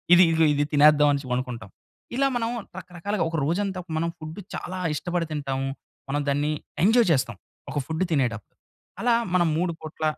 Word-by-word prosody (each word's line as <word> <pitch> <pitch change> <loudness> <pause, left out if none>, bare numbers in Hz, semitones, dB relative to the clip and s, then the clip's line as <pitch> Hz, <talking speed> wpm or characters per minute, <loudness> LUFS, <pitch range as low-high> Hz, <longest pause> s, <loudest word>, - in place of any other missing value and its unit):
ఇది 180 - +8
ఇదిగో 165 0 +4
ఇది 145 0 +1
తినేద్దాం 150 0 +6
అనేసి 140 -2 -3
అనుకుంటాం. 125 -5 -5 0.5
ఇలా 275 +2 +3
మనం 230 -1 0 0.3
రకరకాలుగా 185 +1 -3
ఒక 165 - -4
రోజంతా 190 +4 -1 0.4
ఫుడ్ 155 +3 -7 0.2
చాలా 185 +1 -5 0.2
ఇష్టపడి 175 +2 -1
తింటాము. 135 -3 -2 0.4
మనం 145 +2 0
దాన్ని 145 +2 +1 0.3
ఎంజాయ్ 230 +2 +5
చేస్తాం. 130 -4 +1 0.3
ఒక 145 - -1
ఫుడ్డు 160 +5 -1
తినేటప్పుడు. 120 -8 -1 0.5
అలా 240 0 +3 0.2
మనం 175 -2 +4
3 175 +1 +1
పూట్ల 155 0 -8
160 Hz, 155 wpm, -25 LUFS, 140-185 Hz, 0.5 s, ఇది